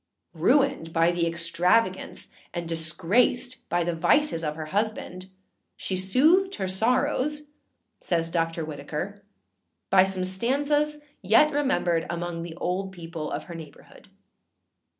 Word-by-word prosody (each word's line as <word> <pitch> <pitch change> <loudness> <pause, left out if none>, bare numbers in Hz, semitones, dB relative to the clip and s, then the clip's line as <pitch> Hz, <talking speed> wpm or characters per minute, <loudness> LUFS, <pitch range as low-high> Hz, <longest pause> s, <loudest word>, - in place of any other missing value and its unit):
âRuined 215 - +2
by 165 +1 +3
the 170 -1 0
extravagance, 175 +4 +1 0.2
and 170 -1 -4
disgraced 185 +10 +2
by 175 +1 +1
the 175 +1 -1
vices 170 - +2
of 150 -1 -2
her 155 0 -6
husband, 200 -3 -3 0.5
she 190 - -3
soothed 305 - +3
her 190 -2 -3
sorrows,â 255 +8 +1 0.6
says 165 -2 +1
Dr. 165 -1 -2
Whitaker, 155 +7 -6 0.7
âby 190 0 +6
some 190 -1 -2
stanzas 290 +9 0 0.2
yet 225 +10 +4
remembered 220 - 0
among 170 0 -4
the 165 -1 -7
old 185 +3 -3
people 165 -4 -7
of - - -4
her 175 - -10
neighbourhood. 160 -3 -13
185 Hz, 125 wpm, -25 LUFS, 165-245 Hz, 0.7 s, âby